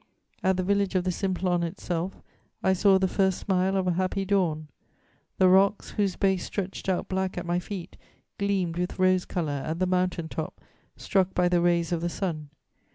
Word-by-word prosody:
"At 190 -1 +2
the 185 - 0
village 200 0 +1
of 185 - +2
the 185 - 0
Simplon 180 -1 0
itself, 175 +1 -4 0.4
I 190 - +4
saw 195 +1 +5
the 190 0 +2
first 190 0 +1
smile 190 0 +1
of 190 - 0
a 180 - +2
happy 185 +2 -1
dawn. 170 -6 0 0.7
The 185 - +5
rocks, 195 +2 +3
whose 200 -3 0
base 190 -2 +1
stretched 190 -1 -4
out 185 - 0
black 190 -1 -2
at 175 - -3
my 175 +1 0
feet, 180 -1 -7 0.4
gleamed 190 -4 0
with 180 0 -2
rose 185 -1 +3
colour 150 -6 -2
at 160 +1 -3
the 185 - +1
mountain 180 -2 0
top, 160 -1 -5 0.4
struck 190 -1 0
by 180 0 +3
the 175 -1 +2
rays 170 -1 +2
of 170 -2 0
the 175 - -1
sun. 160 -5 -4
185 Hz, 190 wpm, -27 LUFS, 175-190 Hz, 0.7 s, saw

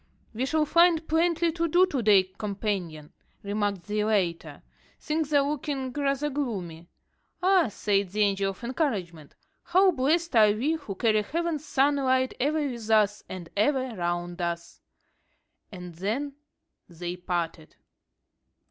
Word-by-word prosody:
"We 250 +4 -2
shall 310 +1 +1
find 335 0 +4
plenty 335 +1 +2
to 335 +1 -1
do 355 +3 +5
to 285 -9 -2
day, 205 -3 +5
companion," 185 -5 -4 0.3
remarked 205 -2 -2
the 210 +3 -1
latter; 185 -6 -1 0.4
"things 310 -1 -2
are 285 -1 +3
looking 275 -3 -3
rather 285 +1 -1
gloomy." 185 - -4 0.6
"Ah!" 370 -5 +4
said 200 -2 0
the 210 +3 -2
Angel 195 -1 +2
of 195 +4 -9
Encouragement, 205 - -3 0.3
"how 370 +2 +4
blessed 320 +2 0
are 215 -2 +6
we 250 +9 0
who 220 -11 -5
carry 215 +1 +2
heaven's 320 +5 -3
sunlight 265 -2 +2
ever 295 +2 +1
with 235 -4 -6
us, 210 -1 +3
and 180 -3 -7
ever 260 +3 +1
round 175 0 -3
us!" 170 0 -4 0.9
And 180 -3 -9
then 225 - -3 0.6
they 175 +1 -5
parted. 170 -3 -4
225 Hz, 135 wpm, -27 LUFS, 190-295 Hz, 0.9 s, are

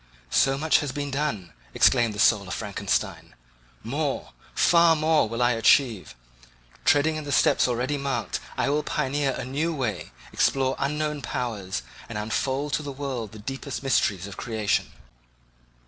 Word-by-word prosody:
So 135 0 +3
much 155 +2 +3
has 145 -4 -3
been 145 +1 -4
done, 130 - -2 0.2
exclaimed 120 -4 +4
the - - -7
soul 105 -3 +4
of 90 - -4
Frankenstein—more, 85 - -4 0.2
far 170 -1 +5
more, 155 -5 +2
will 115 +2 -1
I 120 - +4
achieve; 115 -2 +2 0.7
treading 155 +2 +3
in 155 - -5
the 145 - -5
steps - - +4
already 125 +4 -1
marked, 130 -8 -2 0.2
I - - +1
will 150 +1 +1
pioneer 145 -2 -1
a 130 - -5
new 155 +6 -1
way, 120 -7 -3 0.2
explore 135 -1 +2
unknown 150 +1 -1
powers, 110 - -3 0.3
and 115 - -5
unfold 135 +7 -2
to - - +1
the 145 -1 -6
world 130 -6 -4
the 110 - -11
deepest 135 +4 -6
mysteries 100 -8 +1
of 100 -2 -9
creation. 110 -3 -1
130 Hz, 150 wpm, -25 LUFS, 110-145 Hz, 0.7 s, far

